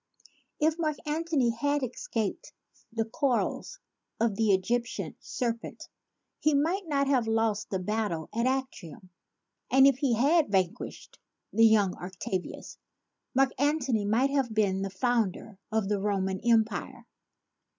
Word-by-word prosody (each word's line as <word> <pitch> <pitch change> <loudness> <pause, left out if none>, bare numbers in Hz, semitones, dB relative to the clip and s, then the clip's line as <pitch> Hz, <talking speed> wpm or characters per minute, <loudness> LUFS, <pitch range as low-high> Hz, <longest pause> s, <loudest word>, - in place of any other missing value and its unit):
If 315 +2 +2
Mark 305 -3 0
Antony 300 -5 +1
had 285 +5 0
escaped 255 - -3 0.4
the 225 0 -1
coils 275 - -1 0.4
of 230 -2 +2
the 220 0 +2
Egyptian 235 +6 -1
serpent, 235 -2 -4 0.5
he 305 -1 +2
might 335 +6 0
not 280 -2 +1
have 260 -5 +2
lost 225 -1 0
the 190 - -1
battle 185 -4 -2
of 235 +3 +1
Actium; 205 - -4 0.6
and 265 +1 +6
if 275 -2 +4
he 265 -5 +2
had 295 +6 +3
vanquished 185 -3 -2 0.3
the 225 +1 +6
young 205 -4 +3
Octavius, 185 +1 -5 0.6
Mark 270 0 +4
Antony 275 -7 +1
might 240 +7 +2
have 270 -4 0
been 195 -3 +2
the 195 - -2
founder 215 -1 -1
of 220 -2 0
the 205 0 0
Roman 195 -2 -1
Empire. 230 +2 0
230 Hz, 130 wpm, -28 LUFS, 205-275 Hz, 0.6 s, and